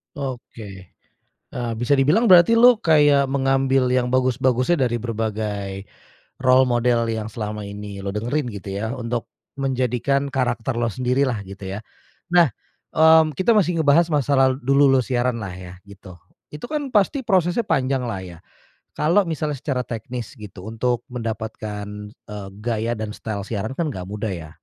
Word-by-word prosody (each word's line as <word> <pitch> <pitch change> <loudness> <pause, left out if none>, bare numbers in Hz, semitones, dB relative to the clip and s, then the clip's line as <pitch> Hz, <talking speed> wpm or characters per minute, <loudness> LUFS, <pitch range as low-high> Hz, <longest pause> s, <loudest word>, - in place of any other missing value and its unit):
Oke. 115 -8 -8 0.5
Eee, 120 -1 -4
bisa 125 +4 +2
dibilang 170 - +3
berarti 180 +4 +7
lu 240 +1 +7
kayak 145 -7 +4
mengambil 135 -1 +1
yang 125 0 0
bagus-bagusnya 130 +3 +2
dari 120 -1 -2
berbagai 105 -4 -3 0.6
role 130 0 +5
model 120 -1 +1
yang 110 -1 -3
selama 105 -1 -5
ini 100 -1 -7
lu 100 - -4
dengerin 120 +7 -2
gitu 100 -3 -8
ya, 110 +4 -3
untuk 120 -1 -4 0.3
menjadikan 135 +1 0
karakter 125 -2 -1
lo 120 - +1
sendirilah 125 -1 0
gitu 95 0 -7
ya? - - -5 0.5
Nah, 175 -2 +6 0.5
mmm, 160 -1 +5
kita 185 +5 +3
masih 180 -5 +2
ngebahas 155 +3 +4
masalah 135 -3 +2
dulu 140 +1 +3
lo 135 -1 +3
siaranlah 120 -5 -1
ya 90 0 -10
gitu. 100 -2 -13 0.3
Itu 150 +7 -8
kan 295 -2 -2
pasti 210 +7 +2
prosesnya 185 +2 +1
panjanglah 130 -6 -1
ya, 85 -2 -11 0.6
kalau 175 +7 +3
misalnya 155 -3 -2
secara 130 -1 -2
teknis 120 +1 -6
gitu 105 -3 -10
untuk 120 +2 -1
mendapatkan, 110 -3 -5 0.3
eee, 105 -2 -9
gaya 115 0 -1
dan 110 0 -5
style 105 -3 -5
siaran 110 0 -3
kan 165 +3 -2
nggak 95 -10 -6
mudah 105 +3 -4
ya? 85 -5 -6
125 Hz, 150 wpm, -22 LUFS, 110-140 Hz, 0.6 s, berarti